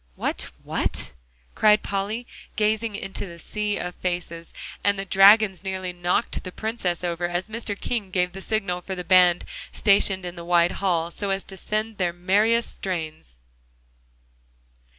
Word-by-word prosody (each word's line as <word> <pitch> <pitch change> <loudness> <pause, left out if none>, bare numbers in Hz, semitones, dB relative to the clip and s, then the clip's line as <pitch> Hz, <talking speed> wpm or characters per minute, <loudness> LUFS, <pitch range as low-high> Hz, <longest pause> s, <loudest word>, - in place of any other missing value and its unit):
"What, - - -2
what?" - - -2 0.4
cried 210 0 +4
Polly, 205 +5 -2 0.3
gazing 215 0 +1
into 195 0 -5
the 170 -1 -10
sea 210 +4 -2
of 180 0 -4
faces, 175 -2 -4 0.3
and 200 0 +3
the 195 - -3
dragons 195 -1 +6
nearly 190 -1 -3
knocked 175 +5 -1
the 185 - -6
Princess 190 -5 -2
over 175 0 -1
as 175 +2 -2
Mr. 220 -2 -4
King 225 -6 -2
gave 180 -1 +1
the 195 +1 -9
signal 195 -4 -1
for 190 +2 -5
the 180 - -5
band 180 -1 +5 0.3
stationed 195 -2 +3
in 175 0 -5
the 170 - -8
wide 175 0 +3
hall, 170 -3 +1
to 195 +1 -1 0.2
send 215 +3 -2
out 215 - -21
their 175 -2 +1
merriest 210 +6 +2
strains. 160 - -5
190 Hz, 150 wpm, -24 LUFS, 175-210 Hz, 0.4 s, dragons